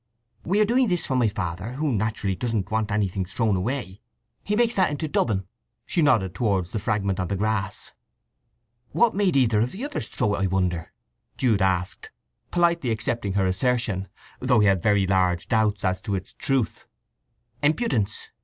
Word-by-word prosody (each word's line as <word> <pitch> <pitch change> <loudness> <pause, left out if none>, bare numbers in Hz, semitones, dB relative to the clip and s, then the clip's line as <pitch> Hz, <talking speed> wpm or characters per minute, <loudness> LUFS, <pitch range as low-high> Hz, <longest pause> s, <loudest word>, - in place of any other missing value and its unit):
"We 195 +4 +1
are 215 - +5
doing 245 +3 +3
this 180 -3 0
for 130 - -1
my 125 -3 +3
father, 100 0 -4
who 150 +2 -1
naturally 110 -3 -1
doesn't 110 -2 -2
want 110 -1 0
anything 100 -3 0
thrown 100 +3 0
away. 100 0 -3 0.4
He 210 - -1
makes 235 +1 +2
that 190 -6 +3
into 150 +2 -3
dubbin." 105 -9 0 0.4
She 170 - 0
nodded 115 - +3
towards 95 -7 0
the 110 - -2
fragment 100 -3 -1
on 90 - -1
the 100 - -1
grass. 100 -1 -2 1.0
"What 235 -1 +4
made 195 -4 +1
either 115 -5 +3
of 115 +3 0
the 225 +9 -5
others 290 - -4
throw 105 - 0
it, - - -1
I 95 - +1
wonder?" 90 -3 -1 0.5
Jude 115 -6 +2
asked, 95 -1 -1 0.4
politely 170 -6 +2
accepting 110 -2 -1
her 95 -1 +2
assertion, 100 0 0 0.3
though 125 -2 +3
he - - +4
had 95 -3 +3
very 100 0 +3
large 90 -2 +1
doubts 105 -3 +1
as 95 0 0
to 100 - -2
its 95 +1 -6
truth. 135 -5 -1 0.7
"Impudence. 145 - 0
110 Hz, 175 wpm, -25 LUFS, 95-130 Hz, 1.0 s, are